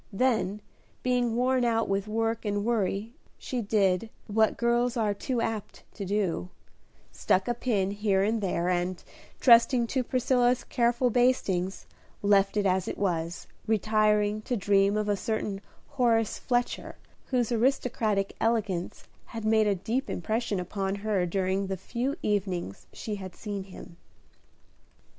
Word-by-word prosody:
Then, 210 -2 0 0.4
being 245 -2 +1
worn 255 +1 +2
out 230 -1 +1
with 195 +1 -1
work 225 +1 -1
and 205 -1 -1
worry, 220 -1 -1 0.2
she 250 -2 -3
did, 200 -1 +1 0.2
what 220 0 +2
girls 240 +1 +1
are 215 -3 +1
too 240 +4 -2
apt 215 -3 -4
to 200 - -6
do, 185 - -1 0.6
stuck 190 +1 +1
a 240 - +1
pin 210 -5 0
here 200 -2 +1
and 220 +2 0
there, 180 -3 -1
and, 180 0 -1 0.4
trusting 235 0 +6
to 255 +2 -1
Priscilla's 250 0 +2
careful 240 0 +1
bastings, 200 -7 +1 0.4
left 200 0 +3
it 205 - +1
as 185 -1 +1
it - - -4
was, 170 -3 -2 0.2
retiring 215 -1 +2
to 245 +3 -2
dream 200 +1 +3
of 210 0 -1
a 205 - +2
certain 205 -1 -3 0.3
Horace 235 -5 +1
Fletcher, 245 -1 -1 0.3
whose 245 -3 0
aristocratic 225 -4 0
elegance 210 -6 -1 0.2
had 225 -1 -7
made 220 -1 +4
a 200 - +2
deep 225 +9 -2
impression 215 +2 -1
upon 195 +2 -2
her 200 -3 0
during 190 +2 0
the 190 0 -3
few 245 - -3
evenings 185 - -2
she 210 -2 -5
had 190 -2 -8
seen 200 -3 -5
him. 185 -2 -12
210 Hz, 145 wpm, -28 LUFS, 195-235 Hz, 0.6 s, trusting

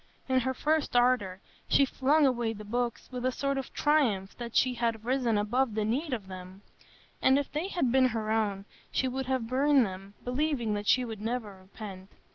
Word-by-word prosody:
In 260 -1 +3
her 260 +1 -1
first 305 -1 0
ardor 240 -7 +2 0.3
she 280 - +5
flung 285 +3 +2
away 240 -4 +1
the 210 -1 -9
books 240 +2 -2
with 250 -1 -5
a 255 - +2
sort 275 +1 -1
of 265 - -7
triumph 240 -11 +1
that 235 -1 -6
she 255 -1 +3
had 230 -2 -2
risen 245 -3 +1
above 225 +3 0
the 215 -1 0
need 270 +8 -1
of 225 -6 -3
them; 185 +1 -10 0.6
and 265 +1 +5
if 285 - -2
they 305 +5 -2
had 345 -11 0
been 260 0 +5
her 220 -3 -2
own, 205 -3 0 0.3
she 260 - +1
would 260 0 -3
have 260 -3 0
burned 270 +2 +3
them, 195 +1 -8
believing 250 -3 0
that 205 0 -3
she 255 -1 +4
would 220 -3 -7
never 225 -2 -3
repent. 190 0 -10
245 Hz, 200 wpm, -29 LUFS, 210-265 Hz, 0.6 s, she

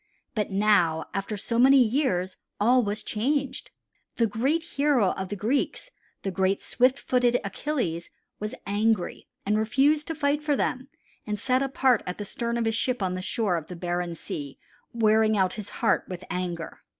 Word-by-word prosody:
But 210 -2 -1
now, 195 -6 +3
after 195 +2 -3
so 230 +4 -1
many 270 +2 +7
years, 235 -7 +2 0.2
all 245 +5 +5
was 210 -1 -2
changed. 270 +5 -1 0.5
The 230 - +3
great 260 +10 0
hero 280 - +2
of 190 -1 -5
the 205 - -3
Greeks, 265 - -1 0.3
the 195 - -2
great 190 +2 0
swift 255 +2 +2
footed 245 -2 +2
Achilles, 195 - -2 0.3
was 210 +1 -4
angry 205 0 0 0.2
and 210 +2 +2
refused 280 +7 +2
to 325 - -3
fight 290 0 +1
for 300 -1 +1
them 260 0 -1 0.4
and 210 -1 -2
sat 255 +3 +1
apart 265 -3 +2
at 180 - -4
the 205 - -5
stern 235 +3 -2
of 235 - 0
his 225 - +1
ship 250 -2 0
on 185 -1 0
the 185 - -3
shore 190 -2 0
of 160 -1 -6
the 180 - -7
barren 175 0 -2
sea 140 -3 -6 0.3
wearing 220 -1 +3
out 185 -2 +2
his 210 -2 -7
heart - - +1
with 180 -1 -6
anger. 175 -2 -4
215 Hz, 175 wpm, -26 LUFS, 190-255 Hz, 0.5 s, many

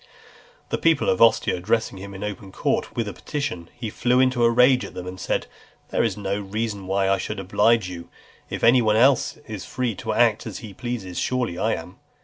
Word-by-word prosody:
The - - -1
people 165 -3 +3
of 95 - -1
Ostia 115 -1 +5
addressing 100 +2 -1
him 100 +1 -8
in 95 - -6
open 100 -2 -6
court - - -1
with 115 -2 -1
a 100 - -4
petition, 115 - -4
he 115 -3 -5
flew 125 +3 +2
into 130 -2 +3
a 115 - +6
rage 125 +2 +5
at - - -9
them, 90 - -6
and 90 0 -7
said, - - -1 0.4
"There - - +1
is - - -1
no 100 0 -2
reason 100 -1 -4
why 95 0 +1
I 95 0 +2
should 105 -1 -4
oblige 105 +2 +2
you: 85 -2 -8 0.4
if - - -5
any 120 +2 +6
one 110 -2 +2
else 130 +3 +3
is 105 -4 -6
free 125 -3 -2
to - - -3
act - - +2
as - - -6
he 105 -3 -9
pleases, 110 -6 -5
surely 125 -9 -1
I 110 +3 +1
am." 85 +2 -9
105 Hz, 215 wpm, -23 LUFS, 95-120 Hz, 0.4 s, a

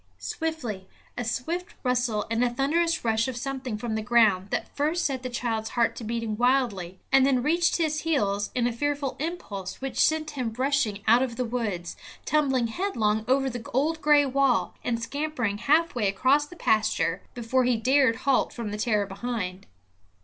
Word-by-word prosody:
Suddenly 220 - -4 0.3
a 245 - -3
swift 330 +10 -3
rustle 245 -4 0
and 230 +2 +2
a 245 - +3
thunderous 315 +6 0
rush 225 +1 +2
of 260 -2 -4
something 260 -3 -4
from 225 +1 -4
the 220 - -1
ground 215 -5 +3
that - - -3
first 310 +5 0
set 265 -3 -1
the 255 - -4
child's 225 -3 -2
heart 235 -1 +1
to - - -6
beating 225 -1 -3
wildly, 235 -8 +1
and 270 0 +6
then 260 -2 +2
reached 340 +4 +2
his 310 -2 0
heels 205 -11 0
in 245 -2 +1
a 240 - 0
fearful 285 +1 -2
impulse 250 - -5
which 270 0 0
sent 310 -1 +1
him 255 -6 -3
rushing 255 -7 0
out 235 +3 +6
of 255 -3 -1
the 250 +1 -1
woods, 215 -8 -3 0.3
tumbling 270 -4 +2
headlong 225 - 0
over 270 +1 +2
the 245 -2 -4
old 315 +4 +1
gray 295 -1 +5
wall, 270 -2 +1
and 235 -1 -1
scampering 255 -6 -2
halfway 280 -3 +2
across 260 +9 +2
the 355 - -12
pasture 215 - +1
before 245 +2 +1
he 245 -1 +2
dared 260 0 +3
halt 265 +3 +1
from 230 -4 -5
the 210 - -5
terror 210 -2 +1
behind. 195 -2 -5
245 Hz, 180 wpm, -26 LUFS, 220-280 Hz, 0.3 s, and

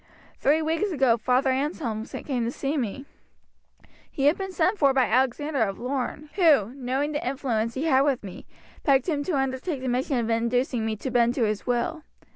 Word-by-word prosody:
Three 310 +3 +3
weeks 325 +6 0
ago 265 -7 +3
Father 250 +4 +1
Anselm 260 -5 -2
came 255 -5 -3
to 230 - -1
see 275 +3 -3
me. 270 0 -3 1.0
He 275 - -4
had 295 +3 +5
been 385 -1 -5
sent 370 +4 +1
for 275 -2 +4
by 260 -2 +4
Alexander 265 +3 +1
of 195 -3 0
Lorne, 275 +3 -4
who, 290 - +4
knowing 270 +2 -2
the 295 - -3
influence 235 -4 -1
he 270 - -2
had 270 -5 +4
with 275 -4 +1
me, 190 -3 -9 0.4
begged 270 -3 +3
him 295 -4 0
to 340 -6 0
undertake 270 +2 -2
the 260 - -4
mission 255 +2 0
of 235 -2 -1
inducing 235 0 0
me 220 - -1
to 255 +5 -5
bend 240 0 +3
to 245 - +1
his 215 +1 -1
will. 250 +6 -1
265 Hz, 195 wpm, -25 LUFS, 240-290 Hz, 1.0 s, had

